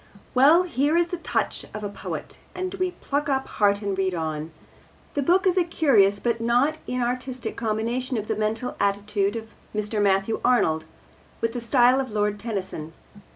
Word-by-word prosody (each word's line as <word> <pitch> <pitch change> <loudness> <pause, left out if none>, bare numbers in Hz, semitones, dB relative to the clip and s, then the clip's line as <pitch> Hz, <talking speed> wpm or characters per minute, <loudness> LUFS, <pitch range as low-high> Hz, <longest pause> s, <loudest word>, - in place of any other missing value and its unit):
Well, 295 +8 +6
here 305 -2 +1
is 345 0 +2
the 355 - -3
touch - - -2
of 215 - -5
a - - -1
poet, 205 - -7 0.2
and 370 0 -3
we 370 -1 0
pluck 290 -4 -3
up 265 -1 +1
heart 205 0 +1
and 200 -1 -1
read 190 -1 0
on. 160 -1 -3 0.6
The 285 - 0
book 365 +8 +3
is 370 0 +4
a - - +4
curious 235 - +3
but 230 0 -1
not 250 +7 +2
inartistic 250 +1 -2
combination 235 +3 -1
of 215 -1 -3
the - - 0
mental 215 +3 -2
attitude 200 0 0
of 225 -1 -7 0.2
Mr. 210 0 -1
Matthew 195 +2 +2
Arnold 160 -11 +2 0.5
with 230 0 -1
the 245 - -4
style 245 +2 +4
of 260 - -5
Lord 210 -1 0
Tennyson. 190 -8 -5
230 Hz, 175 wpm, -25 LUFS, 205-270 Hz, 0.6 s, Well